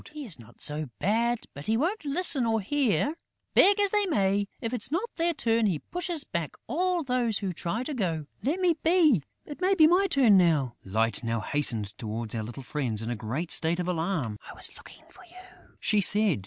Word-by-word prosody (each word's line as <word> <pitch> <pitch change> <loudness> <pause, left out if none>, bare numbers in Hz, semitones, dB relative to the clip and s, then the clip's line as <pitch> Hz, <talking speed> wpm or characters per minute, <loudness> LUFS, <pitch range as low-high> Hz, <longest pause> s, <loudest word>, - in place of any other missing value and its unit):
"He 300 -1 -7
is 180 - -5
not 115 0 -16
so 150 -1 -2
bad; 230 +4 0
but 140 +3 -9
he 220 +1 +2
won't 340 - -1
listen 285 -2 +3
or 225 0 +1
hear. 275 +5 +1 0.4
Beg 405 +1 +6
as 405 -1 +2
they 415 -2 +2
may, 200 - +1
if 230 +1 -4
it's 245 -2 -2
not 345 +7 0
their 340 0 +2
turn, 230 -3 +1
he 180 -6 0
pushes 345 - -3
back 170 - -4
all 350 +5 0
those 250 -5 0
who 195 -3 -3
try 175 +8 -3
to 295 - -4
go.... 170 - -2 0.2
Let 305 +8 -1
me 360 -2 +3
be! 320 - +4 0.2
It 295 +3 -9
may 380 +2 +3
be 320 -4 +6
my 360 +5 +4
turn 240 -8 +5
now!" 155 -9 +2
Light 110 +5 0
now 115 0 -1
hastened 110 -5 0
towards 110 0 -4
our 115 - -2
little 120 +5 -7
friends 120 -6 -3
in 115 - -3
a - - -2
great 125 +10 -4
state 170 +2 +1
of 180 - -2
alarm: 165 - -2
"I - - -10
was - - +1
looking - - -14
for 370 - -16
you," 365 +1 -17
she 210 -1 +2
said. 205 - +4
210 Hz, 210 wpm, -27 LUFS, -, 0.4 s, Beg